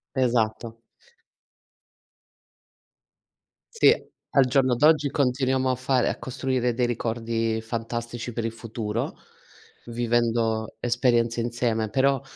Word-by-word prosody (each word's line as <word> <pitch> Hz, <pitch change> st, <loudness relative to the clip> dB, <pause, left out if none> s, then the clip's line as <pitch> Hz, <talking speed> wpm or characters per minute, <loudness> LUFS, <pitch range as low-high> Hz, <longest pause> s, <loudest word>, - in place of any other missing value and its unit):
Esatto. 115 Hz, -3 st, 0 dB, 3.0 s
Sì, 455 Hz, -, +6 dB, 0.4 s
al 135 Hz, -2 st, +4 dB
giorno 130 Hz, -1 st, +2 dB
d'oggi, 150 Hz, +1 st, +4 dB
continuiamo 130 Hz, -1 st, +1 dB
a 130 Hz, -, +1 dB
fare 130 Hz, 0 st, +1 dB
a -, -, -3 dB
costruire 125 Hz, -1 st, -1 dB
dei 125 Hz, 0 st, +1 dB
ricordi 115 Hz, -1 st, -2 dB
fantastici 115 Hz, +1 st, -5 dB
per 115 Hz, 0 st, -3 dB
il 115 Hz, -, -1 dB
futuro, 115 Hz, -1 st, -4 dB, 0.7 s
vivendo 115 Hz, -1 st, 0 dB
esperienze 120 Hz, -1 st, +1 dB
insieme. 115 Hz, -2 st, -1 dB
Però, 135 Hz, +2 st, +2 dB
120 Hz, 95 wpm, -25 LUFS, 115-130 Hz, 3.0 s, Sì